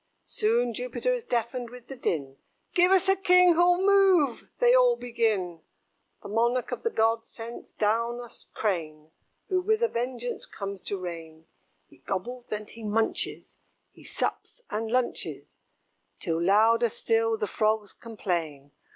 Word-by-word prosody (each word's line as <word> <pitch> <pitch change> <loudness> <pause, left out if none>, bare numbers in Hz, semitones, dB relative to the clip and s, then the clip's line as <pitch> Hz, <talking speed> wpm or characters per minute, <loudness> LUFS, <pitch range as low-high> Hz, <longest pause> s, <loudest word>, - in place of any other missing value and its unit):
Soon 235 +2 +1
Jupiter 250 - -2
is - - -3
deafened 240 +1 -2
with 250 0 -12
the 270 - -7
din 140 - -3 0.4
"Give 360 +1 +4
us 385 0 +4
a 385 - +5
king 360 -2 +5
who'll 355 +2 +3
move," 380 -10 +4
they 485 0 +5
all - - +5
begin. 215 - -1 0.6
The - - -7
monarch 235 +4 0
of - - -4
the 460 - 0
gods 225 - +1
sends 230 +1 -9
down 230 +3 0
a 240 - -7 0.3
Crane, 160 -6 -3 0.4
Who 370 -2 +2
with 435 +4 +1
a - - +5
vengeance 245 - -4
comes 200 -1 -6
to 200 - -2
reign. 165 -3 -8 0.4
He - - -21
gobbles 240 +6 -5
and 210 0 -4
he 230 - -13
munches, 220 +1 -1 0.3
He - - -18
sups - - -4
and 220 +1 -2
lunches; 250 +1 -2 0.6
Till 165 -1 -1
louder 225 +6 +4
still 225 +1 +1
the 210 - -1
Frogs 215 -1 0
complain. 165 -11 -4
230 Hz, 150 wpm, -27 LUFS, 205-265 Hz, 0.6 s, a